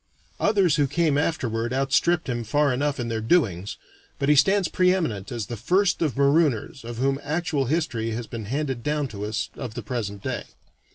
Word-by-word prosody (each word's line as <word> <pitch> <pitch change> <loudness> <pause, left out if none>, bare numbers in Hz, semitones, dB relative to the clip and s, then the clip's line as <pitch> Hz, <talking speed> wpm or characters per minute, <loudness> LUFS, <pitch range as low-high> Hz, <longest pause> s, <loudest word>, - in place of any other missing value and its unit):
Others 195 -7 +3
who 145 -2 +3
came 150 +1 +1
afterward 120 -6 -1
outstripped 140 +6 +2
him 120 -2 -2
far 145 +4 +2
enough 140 +2 -1
in 120 - -2
their 115 -1 -2
doings, 105 - +1 0.4
but 140 - 0
he 150 - +6
stands 190 +6 +4
pre 180 +2 +3
eminent 115 - -2
as 115 -4 -3
the 120 - -5
first 180 - +1
of 150 -8 0
marooners 140 -4 +2
of 115 0 -7
whom 135 +2 +1
actual 155 -2 -1
history 125 -6 -1
has 115 +1 -3
been 110 -1 -7
handed 135 +1 -2
down 150 +1 -1
to 105 -2 -6
us 110 +1 -3
of 120 -5 -6
the - - -5
present 105 -6 -4
day. 130 -5 -3
135 Hz, 190 wpm, -25 LUFS, 115-155 Hz, 0.4 s, he